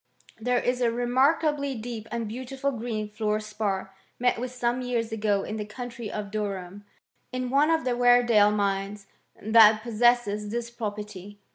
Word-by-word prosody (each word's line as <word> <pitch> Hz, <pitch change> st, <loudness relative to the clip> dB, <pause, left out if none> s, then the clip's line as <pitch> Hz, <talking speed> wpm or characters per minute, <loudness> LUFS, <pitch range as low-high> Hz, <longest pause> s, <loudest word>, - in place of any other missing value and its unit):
There 250 Hz, +2 st, +1 dB
is 245 Hz, +1 st, 0 dB
a 240 Hz, -, +3 dB
re^ 240 Hz, +1 st, -2 dB
markably 280 Hz, 0 st, +2 dB
deep 225 Hz, -1 st, -6 dB
and 235 Hz, -2 st, -3 dB
beautiful 260 Hz, +4 st, -3 dB
green 225 Hz, -3 st, -4 dB
fluor 210 Hz, 0 st, -1 dB
spar, 205 Hz, -3 st, -3 dB, 0.2 s
isM 245 Hz, -1 st, +2 dB
with 250 Hz, +1 st, -4 dB
some 245 Hz, 0 st, -1 dB
years 240 Hz, -2 st, -2 dB
ago 210 Hz, -2 st, 0 dB
in 215 Hz, -, -5 dB
the 210 Hz, -, -3 dB
county 235 Hz, -1 st, -7 dB
of 205 Hz, -2 st, -5 dB
Durham, 200 Hz, -2 st, -4 dB, 0.5 s
in 255 Hz, -1 st, -3 dB
oqifc 300 Hz, +4 st, +4 dB
of 320 Hz, -, -10 dB
the 250 Hz, -1 st, +1 dB
Weredale 240 Hz, -4 st, +5 dB
mines 200 Hz, 0 st, -1 dB, 0.3 s
that 215 Hz, 0 st, +6 dB
possesses 230 Hz, -3 st, +2 dB
this 235 Hz, +1 st, -4 dB
property. 210 Hz, -3 st, -6 dB
230 Hz, 160 wpm, -26 LUFS, 210-245 Hz, 0.5 s, that